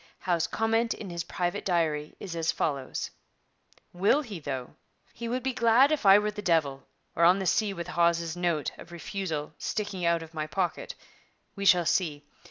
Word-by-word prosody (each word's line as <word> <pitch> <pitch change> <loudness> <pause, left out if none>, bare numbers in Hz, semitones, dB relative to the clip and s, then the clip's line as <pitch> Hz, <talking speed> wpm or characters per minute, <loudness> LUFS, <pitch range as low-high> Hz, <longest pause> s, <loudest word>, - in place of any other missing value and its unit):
Howe's 175 -2 0
comment 225 +1 +1
in 195 -4 -8
his 170 -1 -3
private 175 -1 -2
diary 155 -4 0
is 180 -4 -6
as 165 -1 +1
follows: 140 -4 -2 0.8
'Will 200 +12 +3
he, 210 -9 -7
though? 135 -4 -5 0.4
He 235 - -6
would 250 +2 -2
be 265 -1 -1
glad 245 +4 +5
if 290 -9 +1
I 195 +1 +9
were 210 - +1
with 210 0 -1
the - - -3
devil, 155 -7 0 0.3
or 170 - +2
on 180 +3 +6
the 195 - -3
sea 205 +4 +2
with 170 -3 -6
Hawes's 170 0 +1
note 170 -4 0
[of - - -12
refusal] 165 -2 -4
sticking 205 -4 -3
out 170 -1 +2
of 165 0 -13
my 155 -1 -3
pocket. 180 +1 -2 0.6
We 200 - -4
shall 180 -3 +5
see. 160 -4 0
175 Hz, 185 wpm, -28 LUFS, 160-205 Hz, 0.8 s, I